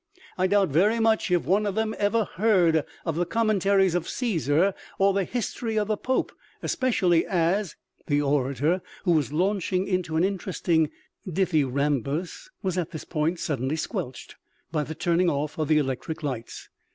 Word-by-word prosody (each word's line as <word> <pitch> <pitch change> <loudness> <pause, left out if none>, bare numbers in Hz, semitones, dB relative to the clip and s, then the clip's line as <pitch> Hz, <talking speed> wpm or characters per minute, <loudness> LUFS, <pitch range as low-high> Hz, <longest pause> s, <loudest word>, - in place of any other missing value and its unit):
I 185 0 +2
doubt 200 -1 +3
very 200 +11 +3
much 225 -2 +2
if 175 -1 +2
one 205 +3 +2
of 200 - -2
them 220 0 0
ever 215 +2 +2
heard 175 -6 +2 0.2
of 165 -3 -1
the 175 - +1
Commentaries 200 -2 +2
of 175 -1 -1
Caesar 185 - +1 0.2
or 195 0 +4
the 195 -1 +1
History 230 0 -3
of 210 0 0
the 215 - +2
Popes, 255 +5 -1 0.3
especially 185 -10 +2
as 180 +2 0
" - - -37
The 145 -1 +2
orator, 145 +4 +1 0.2
who 180 - +2
was 155 -4 +2
launching 185 +2 0
into 180 -4 -1
an 160 - +3
interesting 180 -4 0 0.4
dith 190 +2 0
yrambus, 145 - 0
was 185 -2 0
at 170 - -2
this 155 - -7
point 165 +2 -1
suddenly 135 0 -1
squelched 130 -5 -5 0.3
by 155 -2 0
the 160 +2 -6
turning 170 +2 +2
off 150 +1 -2
of 155 - 0
the 155 0 +4
electric 150 +3 -2
lights. 125 -5 -5
175 Hz, 170 wpm, -26 LUFS, 155-200 Hz, 0.4 s, or